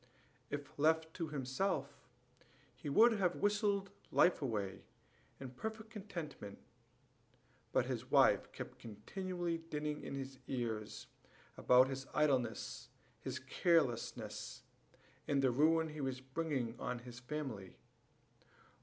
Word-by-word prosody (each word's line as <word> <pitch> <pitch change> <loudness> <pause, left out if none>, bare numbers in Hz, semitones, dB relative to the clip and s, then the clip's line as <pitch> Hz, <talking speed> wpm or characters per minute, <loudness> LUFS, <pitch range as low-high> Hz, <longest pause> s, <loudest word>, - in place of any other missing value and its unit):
If 145 0 -5
left 160 +1 +3
to 165 -3 -3
himself, 145 +1 -2 0.7
he 150 - -5
would 230 +12 +7
have 180 -2 +2
whistled 205 -1 +1 0.2
life 180 - +4
away 100 -7 -2 0.6
in 130 -2 -6
perfect 220 - -5
contentment; 170 - -6 1.1
but - - +3
his - - -3
wife - - +5
kept - - -8
continually 170 - -3
dinning 150 -2 -3
in - - -5
his 135 -1 -6
ears 115 -5 -3 0.5
about 125 +1 +6
his 135 0 -4
idleness, 135 -5 +1 0.3
his - - -4
carelessness, 155 -10 0 0.6
and 140 -1 +2
the 130 - +5
ruin 160 +5 +4
he 150 -1 -6
was 130 -1 -2
bringing 130 -3 -2
on 125 - -2
his 120 0 -9
family. 125 -8 -5
145 Hz, 115 wpm, -37 LUFS, 125-165 Hz, 1.1 s, would